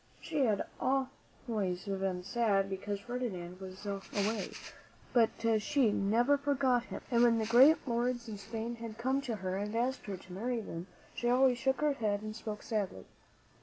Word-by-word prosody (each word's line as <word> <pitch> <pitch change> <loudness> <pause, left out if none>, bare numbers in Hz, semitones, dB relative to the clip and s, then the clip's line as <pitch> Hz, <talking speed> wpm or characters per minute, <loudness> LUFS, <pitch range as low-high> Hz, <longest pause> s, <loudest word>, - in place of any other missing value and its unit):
She 300 -5 0
had 210 -4 +1 0.2
been 265 0 +2 0.8
very 190 -2 -2
sad 200 -2 +1
because 200 +1 -3
Ferdinand 195 -7 -4
was 190 +1 -9
away, 200 +1 -2 0.6
but 235 -3 +5 0.3
she 255 -2 +3
never 235 +8 +3
forgot 270 -4 +2
him; - - -7
and 235 -1 +4
when 235 -1 +5
the 220 - 0
great 260 +8 +6
lords 240 0 0
of 210 -2 -6
Spain 225 +3 -5
had 225 -1 -7
come 260 +3 +1
to 240 -5 -3
her 190 -2 -3
and 210 +2 -3
asked 250 +2 -1
her 195 -2 -3
to 180 0 -12
marry 235 +5 -1
them, 175 -4 -6 0.3
she 240 - -1
always 250 0 +4
shook 265 +4 +1
her 300 -1 +3
head 210 -5 -1
and 215 0 -5
spoke 215 -2 -6
sadly. 200 - -2
225 Hz, 170 wpm, -33 LUFS, 200-250 Hz, 0.8 s, great